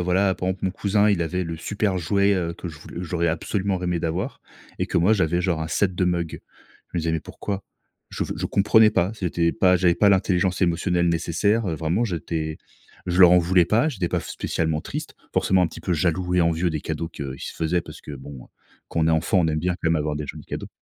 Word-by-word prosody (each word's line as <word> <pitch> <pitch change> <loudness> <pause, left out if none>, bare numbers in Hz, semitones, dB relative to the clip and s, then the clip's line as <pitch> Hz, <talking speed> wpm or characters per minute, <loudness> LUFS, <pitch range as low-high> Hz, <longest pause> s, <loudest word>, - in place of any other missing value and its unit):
voilà, 95 +2 +2
pendant 95 0 -2
que 95 - -8
mon 95 - +1
cousin, 105 +2 +2
il 90 -4 +1
avait 90 +3 -2
le 85 -1 -5
super 100 +1 -1
jouet, 100 +4 +2
heu, 85 -2 -2
que 90 - -7
je 80 -1 -10
voul 85 +3 -8
j'aurais 85 0 -1
absolument 95 +4 -1
rêvé 90 -1 -1
d'avoir, 90 - -3 0.4
et - - 0
que - - -2
moi, 95 +6 +4
j'avais 90 -4 +2
genre 85 -4 0
un 80 - -4
set 95 +3 +1
de 90 - +1
mugs. 85 -2 -1 0.5
Je - - -4
me - - 0
disais: 80 0 -1
«mais 80 - 0
pourquoi?» 100 -1 -5 0.5
Je - - -2
ve - - -4
je - - -2
comprenais 105 +2 +5
pas. 95 +3 +1
C'était 85 -4 0
pas 90 -1 +4
j'avais 85 -1 +3
pas 105 - +4
l'intelligence 95 -1 +2
émotionnelle 85 0 +1
nécessaire, 100 +7 +1
heu. 80 - -1
Vraiment, 85 +9 0
j'étais 80 -4 -3 0.5
je 90 +1 +1
leur 90 -1 +9
en 90 - +7
voulais 90 0 +3
pas. 115 - +3
J'étais 90 -9 -2
pas - - 0
f - - -10
spécialement 80 -2 -1
triste, - - -6 0.2
forcément 95 -1 +3
un - - +3
petit - - -10
peu 90 - -1
jaloux 90 +3 0
et 90 - +4
envieux 85 +1 +1
des 80 -1 -3
cadeaux 80 +1 -4
qu'ils 70 -4 -7
se - - -5
faisaient 85 +1 0
parce - - -11
que, 75 - -9
bon, 70 -2 -10 0.4
quand 80 - -1
on 80 - +3
est - - +4
enfant, 80 +4 +2
on 80 - +2
aime 75 0 0
bien 90 +3 0
quand 80 -2 -1
même 80 - +3
avoir 75 0 -1
des 75 -1 -4
jolis - - -8
cadeaux. - - -5
90 Hz, 245 wpm, -24 LUFS, 80-95 Hz, 0.5 s, leur